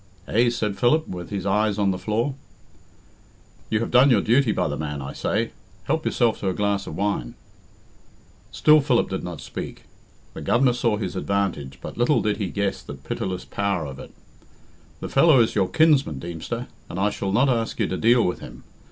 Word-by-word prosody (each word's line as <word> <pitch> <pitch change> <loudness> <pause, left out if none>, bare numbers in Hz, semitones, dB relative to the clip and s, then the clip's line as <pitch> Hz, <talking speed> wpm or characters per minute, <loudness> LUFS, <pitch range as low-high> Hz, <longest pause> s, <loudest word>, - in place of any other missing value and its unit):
"Eh?" 120 +2 +3
said 105 -4 -2
Philip, 155 +6 +3
with 90 -2 -7
his 100 -2 -4
eyes 105 +1 +1
on 100 -2 +2
the 90 - -3
floor. 115 +6 -1 1.4
"You 110 0 +1
have 115 - -3
done 130 +3 +6
your 120 -6 +4
duty 120 +1 +3
by - - 0
the 75 - -3
man, 75 -1 -4
I 70 0 -6
say. 110 +3 -1 0.3
Help 160 +6 -1
yourself 120 -3 +1
to 95 - -1
a 95 - -2
glass 100 -1 -1
of - - -6
wine." 100 -12 -2 1.2
Still 155 0 +5
Philip 125 -7 +1
did 95 - -3
not 90 -3 -6
speak. - - -7 0.5
The - - -8
Governor 125 +1 +3
saw 120 -3 0
his 100 -3 -4
advantage, 95 -9 -2
but - - -7
little 120 +5 +3
did 105 -1 0
he 100 - -2
guess 100 +1 -2
the - - -8
pitiless 90 -1 -4
power 100 -5 -1
of 70 -1 -8
it. - - -10 0.9
"The - - -4
fellow 140 -1 +5
is 115 - +3
your 95 - +2
kinsman, 145 - +3
Deemster, 85 - -5 0.2
and 90 - -5
I 105 +1 +2
shall 95 -1 -3
not 125 +7 +3
ask 115 -3 -1
you - - +2
to - - -2
deal 120 +1 +4
with 90 - -1
him. - - -11
105 Hz, 195 wpm, -23 LUFS, 95-120 Hz, 1.4 s, done